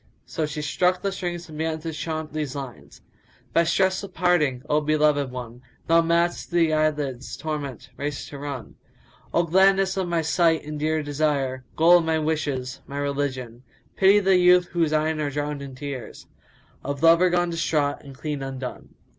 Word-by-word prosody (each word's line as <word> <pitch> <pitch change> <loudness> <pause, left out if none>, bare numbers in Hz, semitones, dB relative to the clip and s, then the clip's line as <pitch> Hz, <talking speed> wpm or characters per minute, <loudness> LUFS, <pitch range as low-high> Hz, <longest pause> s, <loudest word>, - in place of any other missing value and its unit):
So 155 -2 -2
she 150 0 -5
struck 180 +4 +1
the 200 - 0
strings 175 -2 -4
and 155 -1 -9
began 160 0 -1
to 165 0 -5
chaunt 155 0 -4
these 150 -3 -3
lines, 135 -4 -9 0.5
"By 170 - +4
stress 190 +3 +2
of 200 -2 -10
parting, 155 -7 +2
O 150 0 +2
beloved 150 -2 +2
one, 125 -1 -8
* - - -36
Thou 165 0 +5
mad'st 170 +1 0
these 170 -2 +2
eyelids 145 -4 -1
torment 150 -5 -5
race 145 0 -4
to 140 - -8
run: 140 -5 -7 0.5
Oh 170 - +2
gladness 190 +3 +3
of 190 -2 0
my 170 -1 0
sight 160 -1 +2
and 150 0 -5
dear 155 +1 0
desire, 140 -3 -1
* - - -32
Goal 175 +2 +6
of 165 - -3
my 160 0 +1
wishes, 145 -5 -2
my 140 - -6
religion! 135 -4 -3 0.3
Pity 195 +1 +5
the 190 -2 +4
youth 180 0 +5
whose 165 -3 0
eyne 155 0 +1
are 150 -1 -1
drowned 145 0 -3
in 135 -2 -8
tears 140 -2 -7 0.3
* - - -32
Of 140 +2 -4
lover 165 +2 +6
gone 175 0 +1
distraught 150 -3 0
and 135 -2 -12
clean 150 -1 -4
undone." 135 -2 -7
155 Hz, 185 wpm, -24 LUFS, 140-170 Hz, 0.5 s, Goal